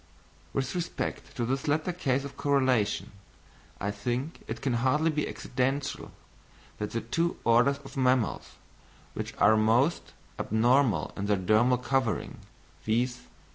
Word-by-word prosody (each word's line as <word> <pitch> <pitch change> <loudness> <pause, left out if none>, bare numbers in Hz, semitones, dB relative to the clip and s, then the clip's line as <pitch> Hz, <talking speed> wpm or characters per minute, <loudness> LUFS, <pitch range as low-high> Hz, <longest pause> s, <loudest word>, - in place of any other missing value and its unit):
With 135 0 -2
respect 170 -4 -4
to 120 - 0
this 135 +3 -2
latter 155 +4 +1
case 135 -6 0
of 140 - -8
correlation, 130 -7 +1 0.7
I 100 - -1
think 120 +9 -3
it - - -4
can 130 - -1
hardly 150 +5 +2
be 150 -1 -1
accidental 135 +2 -2 0.7
that 105 - -2
the 115 - -3
two 165 +10 -1
orders 120 +4 +4
of - - -11
mammals 125 -3 +1 0.6
which - - -5
are 110 - +5
most 115 +9 +2 0.3
abnormal 120 +3 +2
in 100 0 -3
their 105 -1 +2
dermal 110 +7 +3
covering, 130 -5 -1 0.4
viz. 120 +3 0
130 Hz, 135 wpm, -28 LUFS, 115-140 Hz, 0.7 s, are